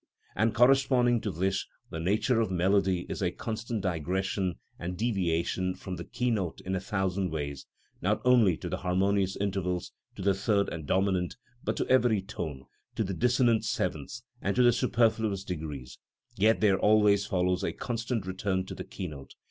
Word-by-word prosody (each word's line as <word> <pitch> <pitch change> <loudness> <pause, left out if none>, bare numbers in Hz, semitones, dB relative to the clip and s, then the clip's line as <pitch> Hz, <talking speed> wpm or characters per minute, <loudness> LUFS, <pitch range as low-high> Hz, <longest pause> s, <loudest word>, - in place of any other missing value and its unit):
And 110 0 +1
corresponding 125 -1 +4
to 105 - -2
this 95 +3 -1 0.2
the 80 - -4
nature 110 +7 +2
of 110 - 0
melody 95 0 +2
is - - -5
a 90 - +2
constant 110 +3 -4
digression 95 +1 -1 0.2
and 90 +1 -4
deviation 90 -4 0
from 95 0 -6
the 85 - -5
key 125 +5 -1
note 95 -7 -2
in 95 - -4
a 95 - 0
thousand 95 -1 -1
ways, 70 -3 -4 0.3
not 105 +4 +1
only 115 -9 +5
to - - -6
the - - -2
harmonious 95 +1 +1
intervals 95 -3 -2 0.2
to - - -6
the 100 0 +4
third 100 +1 +1
and 80 -4 -6
dominant, 95 0 +1 0.3
but - - -1
to - - -1
every 120 -5 +4
tone, 75 -9 -5 0.3
to - - 0
the 95 -1 -3
dissonant 120 +1 +3
sevenths 110 - -3 0.2
and 100 - -1
to 125 - +4
the 120 -1 +6
superfluous 115 -5 +1
degrees; 75 -8 -6 0.4
yet 110 +3 +3
there 100 -3 +4
always 105 -2 +4
follows 90 0 +1
a - - 0
constant 115 -2 -3
return 95 0 -1
to - - -7
the - - -6
key 95 - -7
note. 70 -4 -10
95 Hz, 175 wpm, -29 LUFS, 90-110 Hz, 0.4 s, the